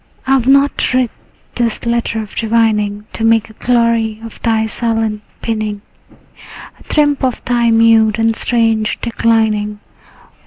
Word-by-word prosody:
I 265 - -1
have 260 -3 +2
not 275 -1 +3
writ 255 -3 +1 0.4
this 235 -2 -2
letter 235 -1 -1
of 210 - -12
divining 215 -2 0
To 225 - -4
make 225 -1 +2
a - - -16
glory 230 -2 0
of 230 - -11
thy 220 -1 +1
silent 225 -1 -2 0.2
pining, 215 -2 -3 1.0
A - - -18
triumph 290 -2 +2
of 255 -2 -2
thy 240 -1 +2
mute 225 -1 +4
and 225 0 +1
strange 225 -2 0
declining. 220 -3 0
225 Hz, 140 wpm, -15 LUFS, 220-235 Hz, 1.0 s, mute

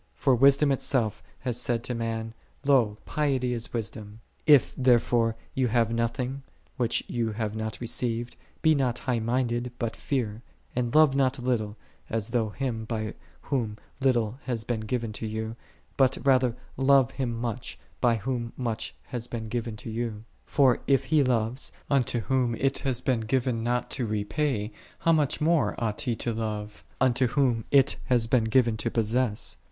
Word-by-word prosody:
"" - - -39
For 135 - +3
Wisdom 140 +3 +5
Itself 125 -5 +1 0.2
hath 120 -2 -2
said 120 -2 0
unto 125 - -3
man, 115 -1 -3 0.2
" - - -30
Lo, 120 -7 +3
piety 135 -5 0
is 115 -1 -3
wis 115 -3 -2
dom!"'3 105 0 -10 0.3
If 145 -4 +6
therefore 120 -2 +3 0.2
thou 130 -1 +2
hast 115 -1 +2
nothing, 125 +4 -1 0.3
which 120 -3 0
thou 115 -2 -1
hast 105 -1 -2
not 110 -2 -4
received, 120 0 -2
" - - -35
Be 160 - +6
not 130 -5 +1
high 125 -2 -1
minded, 120 +1 0
but 115 -2 -2
fear."14 115 -6 -2 0.3
And 120 0 -1
love 155 -3 +6
not 135 -2 +3
thou 125 - -7
little, 110 -4 0 0.3
as 110 -1 -2
though 115 -2 +1
Him 115 -1 -3
by 110 -1 -3 0.3
Whom 115 -7 -2 0.2
little 125 -3 +1
hath 115 -4 -2
been 120 -2 -1
forgiven 110 0 -2
to 110 - -4
thee; 110 +1 -3 0.4
but, 135 -1 +4
rather, 130 -3 +4 0.2
love 135 -1 +5
Him 125 -4 -2
much, 120 0 -4 0.2
by 120 -2 +3
Whom 120 +1 -3
much 115 -3 -3
hath 120 -1 -6
been 110 -2 -5
given 115 -1 -3
to 110 +1 -7
thee. 115 -1 -2 0.3
For 135 -4 +3
if 135 -1 +4
he 155 -2 +3
loves, 120 0 0 0.2
unto 125 -3 +2
whom 120 +2 +1
it 135 +3 0
hath 130 -2 -2
been 130 -3 +2
given 120 +1 0
not 120 +1 -1
to 120 - -2
repay: 110 +2 -1 0.3
how 165 - +2
much 150 -4 +2
more 160 0 +2
ought 110 -3 -1
he 120 -3 0
to 115 +2 -2
love, 105 -1 -4 0.2
unto 130 0 +3
whom 125 -3 +1
it 140 -1 +4
hath 120 -3 +1
been 120 -4 +4
given 115 -1 +3
to 115 - -1
possess. 115 0 0
120 Hz, 180 wpm, -27 LUFS, 115-130 Hz, 0.4 s, If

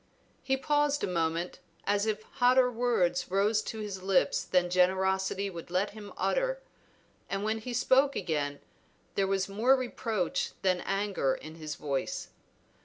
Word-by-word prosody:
He 265 0 0
paused 290 +1 +1
a - - +1
moment, 170 0 -1 0.2
as 205 +1 +1
if 215 0 -1
hotter 250 +1 +3
words 185 -8 +1
rose 205 +3 +2
to 220 0 -5
his 200 -3 -5
lips 190 0 +2
than 180 -1 +1
generosity 190 +2 +2
would 170 -4 -8
let 185 +4 0
him 205 -1 -10
utter, - - 0 0.7
and 195 +1 -2
when 220 +1 0
he 245 +3 -6
spoke 260 +3 +3
again 145 -5 -2 0.5
there 195 -1 +1
was 195 0 0
more 225 +7 +4
reproach 230 -7 -2
than 185 -2 +2
anger 195 -9 0
in 155 - -9
his 155 -2 -6
voice. 140 -3 -3
195 Hz, 150 wpm, -30 LUFS, 180-230 Hz, 0.7 s, more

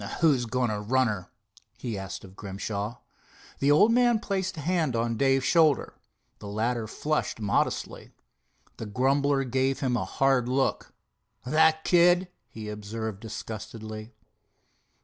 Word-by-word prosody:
"Who's 140 -8 +3
going 125 -1 0
to 105 - -2
run 130 +5 +2
her?" 95 -4 -4 0.5
he 115 -3 -4
asked 95 -1 -6
of 95 -1 -13
Grimshaw. 100 +3 -4 0.6
The 140 - +2
old 155 +10 +6
man 240 -1 +4
placed 190 -4 -3
a - - -4
hand 160 -5 0
on 115 0 0
Dave's 135 +1 +2
shoulder. 155 -5 +3 0.5
The - - -9
latter 110 +2 -1
flushed 150 +2 -2
modestly. 105 -2 -1 0.7
The 110 - -6
grumbler 135 +5 +2
gave 130 +2 0
him 130 -3 +1
a 100 -6 -1
hard 130 +3 +1
look. 135 +1 0 0.5
"That 160 +3 +3
kid?" 175 +1 +4 0.2
he 110 -1 -8
observed 105 0 -5
disgustedly. 110 0 -7
125 Hz, 135 wpm, -27 LUFS, 110-150 Hz, 0.7 s, old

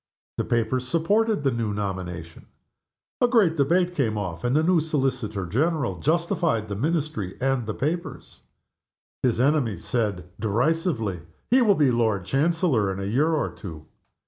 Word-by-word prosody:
The - - 0
papers 120 +2 0
supported 200 - +1
the 135 - +2
new 115 -3 -2
nomination. 90 -5 -5 0.7
A 245 - +6
great 215 -10 +3
debate 175 +5 +2
came 115 -10 0
off, 90 -5 -4
and 125 +2 +1
the 155 - +3
new 175 0 +4
Solicitor 130 - -1
General 125 - 0
justified 160 -8 0
the 100 - -3
Ministry 145 - -2
and 130 -3 0
the 110 - -3
papers. 165 +5 -4 0.8
His 125 -3 +1
enemies 130 - +1
said, 100 -7 -2
derisively, 115 - 0 0.3
"He 255 +2 +6
will 210 -4 +5
be 145 -6 +3
Lord 110 -6 +1
Chancellor 140 - +1
in 95 - -5
a - - -3
year 135 +11 +2
or 155 -3 0
two!" 80 -6 -9
130 Hz, 150 wpm, -25 LUFS, 105-160 Hz, 0.8 s, A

